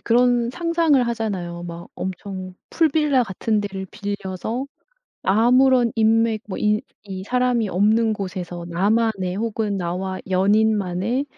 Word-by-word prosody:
그런 240 0 +3
상상을 335 -2 +2
하잖아요. 190 -7 -3
막 170 0 -8
엄청 185 0 -6 0.2
풀빌라 300 -5 +3
같은 210 +1 -1
데를 195 -2 -5
빌려서 205 +4 -4 0.6
아무런 245 +4 +4
인맥 225 0 +2
뭐 190 - -4
이 210 0 +2 0.3
이 190 0 -5
사람이 250 -2 +1
없는 220 +4 +3
곳에서 180 -4 -5
나만의 195 0 +1
혹은 215 -2 -1
나와 185 +2 -3
연인만의 205 +4 +1
215 Hz, 260 characters per minute, -22 LUFS, 190-235 Hz, 0.6 s, 아무런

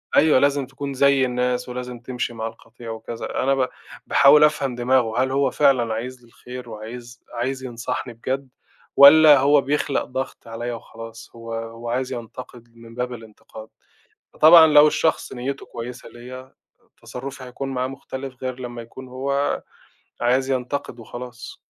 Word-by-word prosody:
أيوه، 155 -4 +5
لازم 140 0 +2
تكون 140 +1 -6
زي 140 0 +4
الناس، 125 0 -1
ولازم 125 -1 -6
تمشي 125 0 -4
مع 115 -1 -4
القطيع 115 +1 -12
وكذا. 115 +2 -5
أنا 135 +1 +2
ب 130 -1 +1 0.4
باحاول 150 +2 +6
أفهم 140 -4 +2
دماغه، 120 -1 +2
هل 130 - -2
هو 140 0 +1
فعلًا 130 -6 +2
عايز 125 +3 -6
لي 120 - -20
الخير 125 +1 -10
وعايز 120 +3 -9
عايز 130 +2 -3
ينصحني 120 0 -5
بجد، 130 +4 -4 0.5
والّا 145 +1 +9
هو 140 +2 +4
بيخلق 140 0 -1
ضغط 130 -1 -6
عليَّا 120 +1 -5
وخلاص، 115 0 -10
هو 115 0 -8
هو 115 +1 -6
عايز 125 +2 -2
ينتقد 120 0 -10
من 115 0 -14
باب 125 0 -3
الانتقاد. 110 -1 -12 0.6
فطبعًا 160 +1 +8
لو 150 -1 +7
الشخص 160 +1 0
نيَّته 135 +2 -5
كويسة 120 +2 -8
ليَّا، 130 +2 -11 0.5
تصرُّفي 130 +1 -8
هيكون 130 +2 -6
معاه 130 -1 -2
مختلف، 130 -1 -8
غير 130 0 -4
لمّا 120 -1 -6
يكون 130 +3 -12
هو 140 +2 -1 0.6
عايز 130 +3 +2
ينتقد 130 -1 -3
وخلاص. 120 +1 -9
125 Hz, 150 wpm, -22 LUFS, 120-135 Hz, 0.6 s, والّا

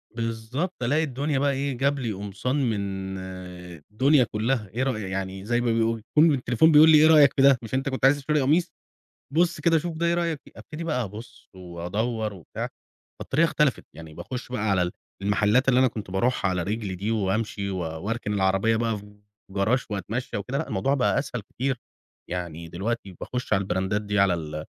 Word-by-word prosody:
بالضبط، 115 +8 -3
ألاقي 150 +7 +2
الدنيا 140 0 -1
بقى 140 0 +2
إيه 135 -1 -2
جاب 140 +2 +1
لي 120 -4 -2
قمصان 100 +6 -3
من 95 -2 -3 0.7
الدنيا 135 +5 +4
كلها. 110 +1 -1
إيه 125 +3 0
رأيك، 125 -6 -1
يعني 95 0 -4
زي 120 +2 +1
ما 120 -1 +1
بيقولوا، 115 0 +1
يكون 150 +8 +3
التليفون 130 +4 +3
بيقول 155 +2 +8
لي 155 - +8
إيه 155 +1 +7
رأيك 150 -4 +7
في - - +1
ده، 135 -1 +7
مش 115 -3 -9
أنت 135 +1 0
كنت 130 0 0
عايز 135 +2 +5
تشتري 150 +1 0
قميص، 160 +7 +2 0.6
بُص 170 0 +2
كده 165 +1 +4
شوف 160 0 -3
ده، 170 - 0
إيه 170 - +3
رأيك 170 -3 -1
في. - - -16
أبتدي 160 +1 -8
بقى 150 -7 -1
أبُص 110 +4 -10
وأدور 100 +6 -3
وبتاع. 90 -5 -6 0.5
فالطريقة 155 +5 +2
اختلفت، 150 -5 +1
يعني 80 0 -10
باخش 125 +9 -7
بقى 110 -3 -1
على 90 -2 +1 0.3
المحلات 105 +6 +2
اللي 125 -1 +4
أنا 130 - +5
كنت 110 -5 -6
باروحها 100 +1 +1
على 90 -2 -1
رجلي 105 -1 -3
دي، 100 +5 -2
وأمشي، 105 -1 -1
و 95 - -3
وأركن 100 +7 -3
العربية 95 +3 +2
بقى 115 -1 0
في 105 0 -14 0.3
جراج 105 +6 +1
وأتمشى 105 +5 -3
وكده، 125 +7 -3
لأ، 160 - -2
الموضوع 135 +9 0
بقى 135 -2 +2
أسهل 130 -4 -4
كتير. 130 +5 -3 0.5
يعني 85 -2 -5
دلوقتي 100 +2 -4
باخش 125 0 -3
على 95 0 +1
الbrandات 95 +3 -1
دي، 105 0 -1
على 100 -2 +4
ال 75 -2 -5
115 Hz, 190 wpm, -25 LUFS, 100-135 Hz, 0.7 s, بيقول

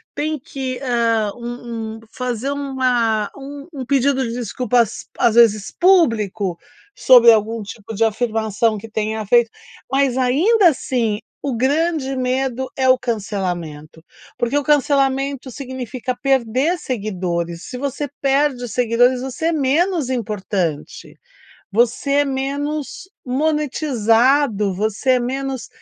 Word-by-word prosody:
tem 305 +1 -2
que, 260 -1 -5
hã, 230 -4 +1
um 235 -2 -6
um - - -13
fazer 250 0 -3
uma 250 -6 0
um 280 +1 -9
um 265 -3 -5
pedido 270 0 +2
de 230 - -4
desculpas, 240 -1 0
às 230 -2 +3
vezes, 215 -3 +4
público 220 - +2 0.4
sobre 245 -2 +7
algum 220 +1 0
tipo 210 +1 -9
de 225 +2 +2
afirmação 220 -1 0
que 225 +2 -9
tenha 215 0 -2
feito, 235 +2 +4 0.4
mas 270 -2 +2
ainda 340 - +4
assim 240 -7 -1 0.2
o 270 -5 -2
grande 285 +1 0
medo 260 0 -1
é 260 -1 +2
o 255 0 +6
cancelamento, 180 -10 -4 0.4
porque 240 +4 0
o 290 - 0
cancelamento 275 -2 +1
significa 255 -1 -5
perder 270 +5 +1
seguidores, 180 - -3
se 250 - -7
você 280 +2 -3
perde 275 -2 +1
seguidores, 245 +2 +2
você 265 +5 -3
é - - +2
menos 315 +1 +1
importante, 195 - -3 0.5
você 240 +5 +1
é 290 +1 +4
menos 285 +5 -3 0.2
monetizado, 260 -6 +1
você 215 +6 0
é 250 - +3
menos 265 0 -3
250 Hz, 125 wpm, -19 LUFS, 220-275 Hz, 0.5 s, sobre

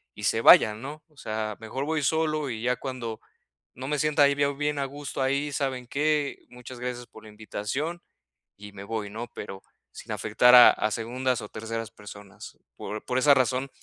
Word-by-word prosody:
y 105 - -10
se 110 - +2
vayan", 110 -1 +7
¿no?, 150 +3 -8
o 150 - -30
sea, 110 -2 -4
mejor 130 +5 -4
voy 160 0 -1
solo 155 0 0
y 110 -1 -5
ya 125 +1 +1
cuando 120 -4 -5 0.6
no 130 +2 -7
me 150 -1 0
sienta 150 -1 +3
ahí 140 - +5
bie 145 0 +1
bien 150 +1 -2
a 140 - 0
gusto 140 0 -6
ahí, 140 +2 0
¿saben 130 -4 -2
qué?, 150 +1 -1
muchas 125 0 -11
gracias 125 -1 -5
por 110 - -15
la 110 - -12
invitación 110 +10 -4 0.6
y 105 0 -11
me 100 - -9
voy, 110 -1 -4
¿no? 115 +3 -6
Pero 95 0 -8 0.3
sin - - -10
afectar 125 0 +3
a 125 - +10
a 110 - -2
segundas 125 +2 -2
o 105 - -8
terceras 115 0 -5
personas. 105 0 -12 0.2
Por 105 0 -6
por 125 0 -1
esa 145 +2 +6
razón 130 +1 0
125 Hz, 195 wpm, -26 LUFS, 110-140 Hz, 0.6 s, a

